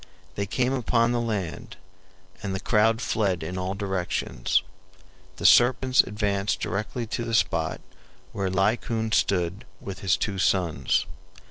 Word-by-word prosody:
They 100 +1 -3
came 125 +6 0
upon 120 -2 +2
the 120 -1 0
land, 100 -10 -4 0.6
and 100 -2 -3
the - - -2
crowd 110 +3 +2
fled 95 -8 0
in 90 +3 -5
all 95 +1 -3
directions. 95 - -1 0.7
The - - -7
serpents 130 +1 +6
advanced 100 -1 -1
directly 105 +4 -3
to 115 +1 -3
the 115 0 -1
spot 115 - 0 0.5
where 95 -2 -2
Laocoon 110 +4 0
stood 95 0 +1 0.2
with 95 -1 -7
his 95 -2 +2
two 100 -3 -2
sons. 85 -8 +1
100 Hz, 135 wpm, -25 LUFS, 95-115 Hz, 0.7 s, serpents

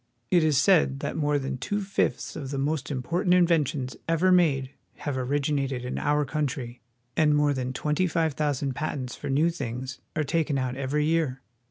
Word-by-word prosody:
It 175 -3 +5
is 155 -3 +3
said 150 -5 +4
that - - -3
more 150 -2 +1
than 135 -2 -3
two 205 - -1
fifths 195 0 -1
of 135 -3 -5
the 140 - -3
most 145 0 -1
important 165 +7 +1
inventions 155 -7 +2
ever 170 +3 +3
made 140 -7 +3 0.2
have 145 -3 -4
originated 135 -1 -1
in 125 - -3
our 150 0 +1
country, 135 -4 -3 0.3
and 150 -2 +4
more 145 -1 +3
than 130 -1 -2
twenty 150 +7 0
five 160 -3 0
thou 150 -1 +1
sand 135 -1 -2
patents 135 -3 -3
for - - -6
new 155 +5 +3
things 130 -4 -5 0.2
are 155 - +1
taken 150 -1 0
out 130 -1 -1
every 140 +3 0
year. 155 -5 0
145 Hz, 185 wpm, -27 LUFS, 130-160 Hz, 0.3 s, It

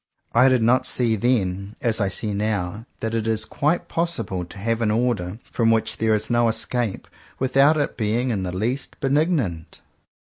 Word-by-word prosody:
I 125 +3 +6
did 130 -3 +2
not 125 +3 +3
see 115 -3 +1
then, 100 -3 -1
as 115 -2 0
I 100 - +1
see 105 +2 -1
now, 105 +1 -2
that 110 0 -2
it 115 -1 -1
is 110 -1 +1
quite 150 +9 -1
possible 165 - -2
to 85 - -13
have 115 +3 -1
an 110 - +2
order 105 -4 0
from 115 -2 +2
which 115 -1 +1
there 110 -1 +2
is 105 0 -1
no 120 -1 +2
escape, 115 -1 -1 0.3
without 135 +4 +4
its 145 - -1
being 115 +3 0
in 100 -4 -1
the 90 -1 -3
least 115 +9 -3
benignant. 135 - 0
115 Hz, 180 wpm, -23 LUFS, 105-125 Hz, 0.3 s, I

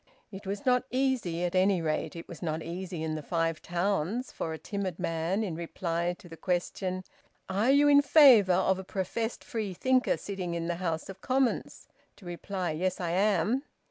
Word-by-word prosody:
It 195 -1 -9
was 200 +1 -4
not 250 -1 +3
easy, 250 -10 0
at 175 0 -1
any 190 0 +3
rate 155 0 -2
it 165 - -8
was 170 - -10
not 160 -2 -2
easy 175 0 -5
in 160 -1 -2
the 155 - -3
Five 165 +1 -1
Towns, 195 +6 -1
for 165 - -4
a 160 - -4
timid 190 +1 -4
man 165 +6 -1
in 190 -6 -3
reply 170 +1 -2
to 185 - -14
the 165 - -10
question, 185 +2 -2 0.4
"Are 200 +6 +1
you 285 +2 +6
in 285 0 +7
favour 265 - +7
of 190 +1 +2
a - - -5
professed 210 +5 -3
Freethinker 230 +4 0
sitting 185 -4 -4
in 165 -1 -2
the 170 0 -2
House 165 -3 -2
of 195 0 -10
Commons?" 260 -1 0 0.3
to 205 - -17
reply, 175 0 -3
"Yes, 180 +4 -1
I 175 -2 -2
am." 210 +7 +2
185 Hz, 185 wpm, -29 LUFS, 170-210 Hz, 0.4 s, in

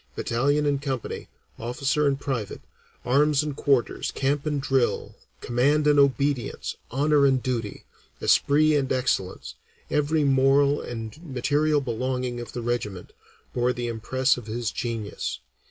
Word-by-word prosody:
Battalion 145 +5 +1
and 140 -1 +1
company, 135 -4 -4 0.3
officer 140 +5 0
and 140 -1 +1
private, 125 -8 -4 0.4
arms 145 +3 +3
and 150 -2 -4
quarters, 135 -4 +1
camp 140 +2 -1
and 150 -1 0
drill, 135 -2 0 0.3
command 140 +5 +2
and 145 -1 +5
obedience, 140 -3 +1
honor 145 +3 +2
and 130 -2 +1
duty, 115 -5 -3 0.4
esprit 155 +2 +4
and 135 -3 0
excellence, 95 - -1 0.4
every 150 +1 +2
moral 140 +1 +3
and 115 +3 -7
material 145 +1 +1
belonging 125 0 -2
of 120 - -8
the 120 - -4
regiment, 105 -6 -3 0.4
bore 125 0 +1
the 120 -1 -4
impress 125 +4 +1
of 120 -3 -9
his 115 0 -2
genius. 115 -4 -4
135 Hz, 135 wpm, -25 LUFS, 120-145 Hz, 0.4 s, and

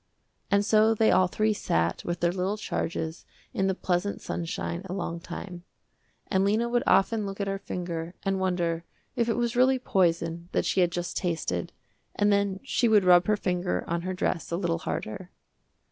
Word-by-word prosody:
And 200 0 +3
so 220 +1 +4
they 220 0 +4
all 185 - +4
three 215 +3 +1
sat 85 - 0
with 175 0 -3
their 170 0 +3
little 190 +3 -1
charges 160 -5 -3 0.3
in 190 - +1
the 190 - +1
pleasant 185 +2 -1
sunshine 170 0 -4
a 185 - -5
long 170 -3 -3
time. 175 +1 -8 0.6
And 190 -2 +1
Lena 215 +4 +2
would 240 0 +1
often 215 +3 +3
look 195 0 -5
at 200 - 0
her 195 0 -2
finger 175 -2 -5
and 195 -1 0
wonder 175 -3 0 0.3
if 235 -1 +1
it 230 - +1
was 240 0 0
really 260 +2 +4
poison 170 -6 0
that - - +1
she 190 - +2
had 175 -1 +3
just 175 0 -3
tasted 160 - -2 0.4
and 205 0 +3
then 200 -1 +1
she 255 -2 +1
would 215 -3 +5
rub 180 -1 +6
her 210 -1 +3
finger 180 - -1
on 170 0 -1
her 185 +1 -3
dress 180 -2 -1
a 170 - -1
little 170 -2 -1
harder. 170 +2 -5
185 Hz, 190 wpm, -27 LUFS, 170-205 Hz, 0.6 s, rub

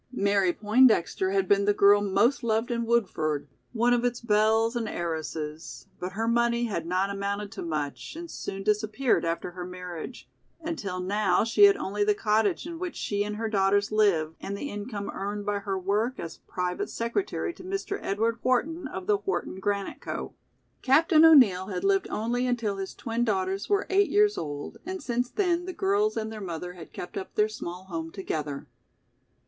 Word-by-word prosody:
Mary 200 -2 +3
Poindexter 215 -3 +3
had 195 -1 +1
been 200 +1 +3
the 205 0 +3
girl 205 0 +6
most 235 +7 +2
loved 225 +2 0
in 235 -1 -1
Woodford, 160 -11 0 0.2
one 240 +1 +2
of 240 0 +1
its 245 -1 0
belles 220 +1 +2
and 230 -2 -2
heiresses, 160 -2 -5
but 180 +1 -5
her 225 +3 -2
money 235 0 +2
had 170 -7 -3
not 185 +3 0
amounted 200 +1 -3
to 225 - -7
much 155 - -4
and 340 0 -7
soon 195 0 -5
disappeared 215 +5 +1
after 170 +1 -2
her 180 0 -7
marriage, 180 +4 -8 0.3
until 260 - -4
now 200 +3 +2
she 230 - +6
had 400 0 +5
only 205 +2 -1
the 210 0 +2
cottage 210 - +1
in 335 -1 -6
which 360 -1 -4
she 205 0 -1
and 210 0 -4
her 225 +1 -2
daughters 200 -1 +2
lived 180 -7 +2
and 200 +1 -4
the 285 - -5
income 205 0 -5
earned 205 +1 -4
by 205 -1 0
her 195 -1 -3
work 210 +7 -1
as 165 - -7
private 180 0 -2
secretary 340 +9 -2
to - - -13
Mr. 390 +2 -3
Edward 225 +4 0
Wharton 290 +6 0
of 190 -7 -6
"The 205 +1 +3
Wharton 190 -1 -3
Granite 200 0 -2
Co." - - -5 0.5
Captain 315 +4 +5
O'Neill 235 - +7
had 185 -3 -4
lived 390 -1 +2
only 240 +3 -1
until 230 -5 -1
his 195 -1 -5
twin 230 0 -2
daughters 195 -3 -1
were 405 -1 +2
eight 395 +1 +4
years 415 0 +4
old 145 -2 -5
and 375 +1 -5
since 245 0 -1
then 355 -2 0
the 370 - -5
girls 405 +3 +1
and 220 0 -2
their 215 -1 -7
mother 180 -1 -5
had 170 -3 -11
kept 180 - -7
up 190 - -9
their 210 0 +3
small 180 -4 -7
home 165 -3 -5
together. 150 -6 -4
210 Hz, 185 wpm, -27 LUFS, 190-240 Hz, 0.5 s, O'Neill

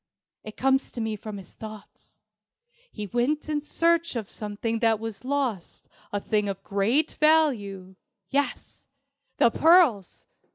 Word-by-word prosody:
It 215 - -10
comes 270 +1 +2
to - - -6
me 220 -1 -2
from 210 0 -7
his 195 - -12
thoughts. 215 -2 -12 0.7
He 210 - -5
went 245 +9 -1
in 300 -1 -1
search 335 +1 +1
of 220 -4 -4
something 215 +2 -3
that 225 -2 +2
was 225 -1 -7
lost 255 -9 -3 0.2
a 205 - -1
thing 210 0 0
of 195 0 -5
great 225 +10 +1
value. 215 -13 +2 0.4
Yes, 285 +1 -2 0.5
the 235 - +4
pearls!" 315 - +3
225 Hz, 135 wpm, -26 LUFS, 205-285 Hz, 0.7 s, the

